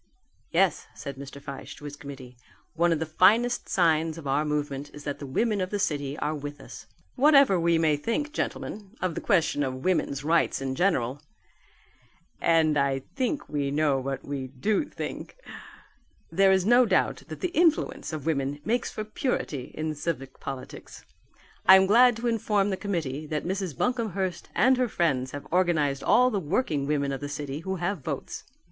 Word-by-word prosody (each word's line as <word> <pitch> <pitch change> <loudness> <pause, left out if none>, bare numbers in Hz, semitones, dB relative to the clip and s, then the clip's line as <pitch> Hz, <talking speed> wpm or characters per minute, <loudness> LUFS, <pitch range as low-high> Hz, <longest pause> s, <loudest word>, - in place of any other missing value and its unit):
"Yes," - - +2
said 140 - -7
Mr. 140 +1 -9
Fyshe 140 -1 -8
to 145 - -12
his 145 0 -6
committee, 135 -3 -10 0.4
"one 170 +1 +2
of 165 - +2
the 160 - -2
finest 220 +10 +3
signs 165 -2 +2
of 165 - -9
our 140 +2 +1
movement 145 -1 -2
is 145 - -10
that 145 -1 -4
the 140 - -7
women 210 - 0
of 185 - -2
the 205 - -2
city 145 -7 -2
are 150 - -1
with 145 -1 -6
us. 125 -1 -11 0.3
Whatever 275 - +5
we 170 0 +3
may 155 -2 +2
think, 290 - -2
gentlemen, 210 -8 -4
of 185 -2 -1
the - - -4
question 165 -6 +2
of 130 -1 -3
woman's 150 -6 0
rights 165 +2 +2
in 135 -1 -3
general 140 -5 0 1.2
and 155 -3 +3
I 135 -1 0
think 275 +2 -1
we 145 -2 -1
know 145 -1 +2
what 135 0 -4
we 140 -2 -4
do 195 - 0
think - - -7 1.0
there 195 0 +4
is 190 -1 +3
no 240 +2 +5
doubt 190 - +1
that - - -8
the 365 - 0
influence 330 - +1
of 155 -4 -5
women 145 -2 -1
makes 235 +2 0
for 215 - -5
purity 210 - -2
in 155 0 -2
civic 145 -4 -4
politics. 135 -2 -8 0.6
I 190 - +11
am 190 0 +6
glad 240 +4 +6
to 230 +2 -6
inform 210 -3 +1
the - - 0
committee 155 -8 -3
that 150 0 -3
Mrs. 190 -4 -3
Buncomhearst 200 -8 -2
and 255 +7 +4
her 250 -2 +1
friends 135 -10 0
have 145 +2 -7
organized 160 -6 +1
all 250 +1 +4
the 205 - 0
working 155 - -1
women 140 -2 0
of 135 - -4
the 145 - -4
city 145 -1 -5
who 190 +3 -3
have 180 +1 -2
votes. 140 0 -5
160 Hz, 180 wpm, -27 LUFS, 140-200 Hz, 1.2 s, I